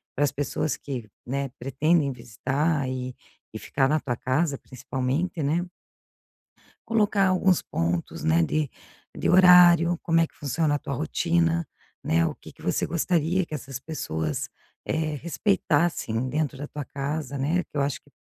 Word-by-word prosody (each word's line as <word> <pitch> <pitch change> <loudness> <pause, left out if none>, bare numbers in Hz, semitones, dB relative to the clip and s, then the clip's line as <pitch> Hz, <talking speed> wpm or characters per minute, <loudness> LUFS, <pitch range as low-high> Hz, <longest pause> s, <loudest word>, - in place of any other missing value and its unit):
para 145 - +1
as 140 - 0
pessoas 145 +1 -1
que, 125 -6 -6 0.2
né, 135 +2 -2
pretendem 140 +3 +2
visitar 130 +5 -1
e 130 -1 -4 0.4
e - - -5
ficar 135 -1 +1
na 155 +1 +2
tua 125 -3 -2
casa 140 +4 0
principalmente, 130 +8 -3
né 160 +5 +1 1.2
colocar 210 -3 +3
alguns 185 -1 +3
pontos, 85 +1 -2
né, 80 +1 +3
de 150 - 0 0.5
de - - -1
horário, 175 -2 +7
como 165 -1 +3
é 165 - +2
que - - -31
funciona 150 +1 0
a - - -2
tua 140 - -5
rotina, 85 - +1 0.4
né, 85 +1 +3
o - - -3
que - - -13
que - - -19
você - - 0
gostaria 170 +2 +1
que - - -10
essas 135 -2 -6
pessoas, 80 - -3 0.4
eh, 155 -1 -1
respeitassem 155 - 0
dentro 150 0 -1
da 145 +2 -6
tua 145 -2 -6
casa, 140 0 -4
né, 160 +7 +1
que - - -33
eu 145 - +1
acho 140 -1 -1
que - - -25
145 Hz, 160 wpm, -26 LUFS, 130-165 Hz, 1.2 s, horário